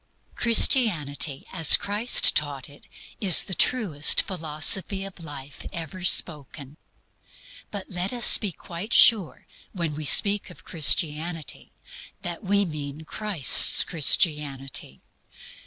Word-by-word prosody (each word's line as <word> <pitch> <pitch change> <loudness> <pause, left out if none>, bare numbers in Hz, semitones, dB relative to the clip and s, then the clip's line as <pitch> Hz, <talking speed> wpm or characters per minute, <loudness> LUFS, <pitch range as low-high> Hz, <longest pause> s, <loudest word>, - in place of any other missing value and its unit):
Christianity 165 - 0
as 165 -5 +4
Christ 210 +4 +3
taught 145 -3 -4 0.5
is 190 -6 +5
the 190 - -6
truest 180 - +2
philosophy 185 +3 0
of 185 -3 -13
life 145 -3 -11
ever 170 +2 -9
spoken. 150 -4 -2 0.9
But 200 -2 -9
let 180 +1 -5
us 245 -1 +4
be 205 -4 -5
quite 175 +6 -10
sure 210 -8 +2 0.3
when 170 -5 -6
we 155 +1 -8
speak 200 +8 +1
of - - -18
Christianity 160 0 -4 0.5
that 175 +2 -7
we 200 +1 -1
mean 150 -2 -9
Christ's 170 - +3
Christianity. 145 - -2
165 Hz, 105 wpm, -22 LUFS, 150-195 Hz, 0.9 s, is